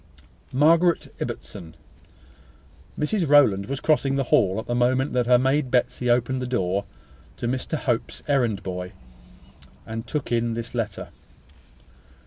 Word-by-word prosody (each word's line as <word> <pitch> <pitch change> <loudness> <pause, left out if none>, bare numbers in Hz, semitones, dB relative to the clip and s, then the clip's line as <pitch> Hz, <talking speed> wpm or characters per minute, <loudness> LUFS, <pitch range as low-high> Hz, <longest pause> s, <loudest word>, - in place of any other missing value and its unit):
"Margaret 165 +5 +3
Ibbotson." 80 -2 -7 1.2
Mrs 165 +1 0
Rowland 105 -10 +5
was 140 +2 -3
crossing 145 -3 +1
the 135 - +1
hall 95 -6 +2
at 110 - -4
the 120 - -2
moment 130 +3 +1
that 125 -1 +1
her 125 0 +6
maid 130 +2 +1
Betsy 125 0 0
opened 125 +2 +1
the 125 - -3
door 100 -5 -1 0.5
to 120 - -3
Mr 130 +5 -2
Hope's 120 -5 -2
errand 125 -8 +1
boy, 90 0 -5 0.9
and 115 0 -6
took 150 -5 -3
in 115 -1 0
this 115 +1 -6
letter. 115 -3 -4
125 Hz, 135 wpm, -24 LUFS, 115-140 Hz, 1.2 s, her